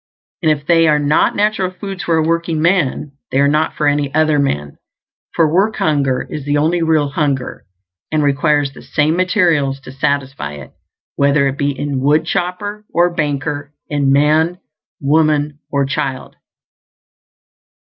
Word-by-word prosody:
And 160 Hz, -3 st, +3 dB
if 145 Hz, -2 st, -2 dB
they 165 Hz, 0 st, +4 dB
are 150 Hz, -1 st, +4 dB
not 150 Hz, +1 st, +2 dB
natural 205 Hz, -2 st, +1 dB
foods 195 Hz, 0 st, -7 dB
for 165 Hz, -1 st, +2 dB
a 160 Hz, -, +2 dB
workingman, 165 Hz, -3 st, 0 dB, 0.2 s
they 135 Hz, -, +1 dB
are 140 Hz, -, +4 dB
not 155 Hz, +2 st, +1 dB
for 150 Hz, -, -1 dB
any 145 Hz, -1 st, +1 dB
other 155 Hz, -1 st, +3 dB
man; 75 Hz, -, -2 dB, 0.6 s
for 165 Hz, -2 st, +4 dB
work 205 Hz, +5 st, +2 dB
hunger 140 Hz, -5 st, 0 dB
is 150 Hz, -, -6 dB
the 145 Hz, +1 st, 0 dB
only 165 Hz, +4 st, +1 dB
real 160 Hz, -3 st, +2 dB
hunger, 140 Hz, -3 st, -2 dB, 0.4 s
and 155 Hz, -1 st, +1 dB
requires 145 Hz, 0 st, +1 dB
the -, -, -13 dB
same 155 Hz, +2 st, 0 dB
materials 170 Hz, -7 st, +1 dB
to 130 Hz, -, -11 dB
satisfy 135 Hz, -, -2 dB
it, 70 Hz, -2 st, -10 dB, 0.5 s
whether 140 Hz, 0 st, +3 dB
it 135 Hz, +1 st, -4 dB
be 140 Hz, -1 st, -1 dB
in 145 Hz, -1 st, -2 dB
woodchopper 180 Hz, +8 st, -1 dB
or 175 Hz, +1 st, +2 dB
banker, 145 Hz, -1 st, -3 dB
in 140 Hz, -2 st, +1 dB
man, 155 Hz, +5 st, +3 dB, 0.4 s
woman 150 Hz, 0 st, +1 dB
or 140 Hz, -1 st, +1 dB
child. 135 Hz, -1 st, -4 dB
150 Hz, 150 wpm, -17 LUFS, 140-165 Hz, 0.6 s, they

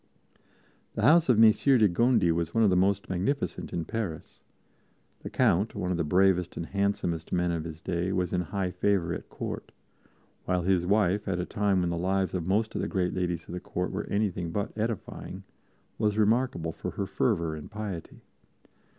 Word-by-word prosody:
The 110 Hz, -, -2 dB
house 160 Hz, +5 st, +5 dB
of 120 Hz, -, +5 dB
Messire 115 Hz, +5 st, +6 dB
de 110 Hz, -3 st, +5 dB
Gondi 110 Hz, -1 st, +3 dB
was 85 Hz, 0 st, -2 dB
one 115 Hz, -, +4 dB
of 105 Hz, -, +4 dB
the -, -, +3 dB
most 100 Hz, +2 st, +2 dB
magnificent 100 Hz, +11 st, -2 dB
in 85 Hz, -2 st, -3 dB
Paris. 95 Hz, -5 st, -5 dB, 0.8 s
The -, -, -7 dB
Count, 100 Hz, +6 st, +2 dB
one 90 Hz, -, -2 dB
of 90 Hz, -, 0 dB
the 85 Hz, -, 0 dB
bravest 90 Hz, +2 st, +2 dB
and 85 Hz, -, -3 dB
handsomest 100 Hz, -4 st, -1 dB
men 90 Hz, -1 st, +1 dB
of 85 Hz, -1 st, -3 dB
his 80 Hz, -1 st, -8 dB
day, 90 Hz, +1 st, -1 dB
was 90 Hz, -1 st, -1 dB
in 90 Hz, -, +1 dB
high 95 Hz, 0 st, -2 dB
favor 90 Hz, -1 st, +1 dB
at -, -, -7 dB
Court; -, -, -6 dB, 0.7 s
while 90 Hz, -1 st, 0 dB
his 90 Hz, -1 st, +2 dB
wife, 105 Hz, 0 st, +2 dB
at 95 Hz, -2 st, 0 dB
a 90 Hz, -, -1 dB
time 100 Hz, -3 st, +1 dB
when 85 Hz, -1 st, 0 dB
the 85 Hz, -, -2 dB
lives 95 Hz, +2 st, 0 dB
of 90 Hz, -2 st, -2 dB
most 110 Hz, +3 st, +1 dB
of -, -, -2 dB
the -, -, -1 dB
great 90 Hz, -3 st, -1 dB
ladies 85 Hz, -2 st, -2 dB
of -, -, -8 dB
the 90 Hz, -, -3 dB
Court 90 Hz, +1 st, -3 dB
were 95 Hz, -, -3 dB
anything 100 Hz, -4 st, -1 dB
but 100 Hz, +4 st, -3 dB
edifying, 110 Hz, -1 st, -4 dB, 0.6 s
was 105 Hz, -1 st, +1 dB
remarkable 110 Hz, -6 st, +1 dB
for -, -, -5 dB
her 100 Hz, -, -3 dB
fervor 85 Hz, -4 st, 0 dB
and 75 Hz, -, -9 dB
piety. 100 Hz, -5 st, -6 dB
95 Hz, 195 wpm, -28 LUFS, 85-105 Hz, 0.8 s, Messire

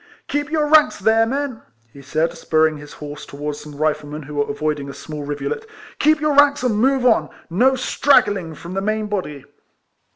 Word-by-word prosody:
"Keep 290 Hz, 0 st, -2 dB
your 310 Hz, -1 st, +1 dB
ranks 305 Hz, 0 st, +5 dB
there, 225 Hz, +3 st, +3 dB
men!" 270 Hz, -2 st, -3 dB, 0.3 s
he 140 Hz, -, -12 dB
said, 160 Hz, +5 st, -1 dB
spurring 160 Hz, -1 st, +1 dB
his 145 Hz, 0 st, -11 dB
horse 150 Hz, 0 st, -8 dB
towards 145 Hz, +1 st, -6 dB
some 150 Hz, -1 st, -11 dB
Riflemen 150 Hz, 0 st, -2 dB
who 150 Hz, +2 st, -10 dB
were 145 Hz, 0 st, -1 dB
avoiding 145 Hz, -1 st, -2 dB
a 140 Hz, -, -8 dB
small 150 Hz, -2 st, -7 dB
rivulet. 145 Hz, -, -4 dB, 0.2 s
" -, -, -19 dB
Keep 310 Hz, +1 st, +4 dB
your 305 Hz, -1 st, +2 dB
ranks 285 Hz, -2 st, +5 dB
and 245 Hz, -4 st, +1 dB
move 265 Hz, 0 st, +2 dB
on, 235 Hz, -3 st, +3 dB
— -, -, -35 dB
no 265 Hz, +1 st, +5 dB
straggling 205 Hz, -, +2 dB
from 170 Hz, +4 st, -9 dB
the 195 Hz, -, -1 dB
main 215 Hz, +1 st, -1 dB
body." 185 Hz, -10 st, -4 dB
175 Hz, 195 wpm, -20 LUFS, -, 0.3 s, ranks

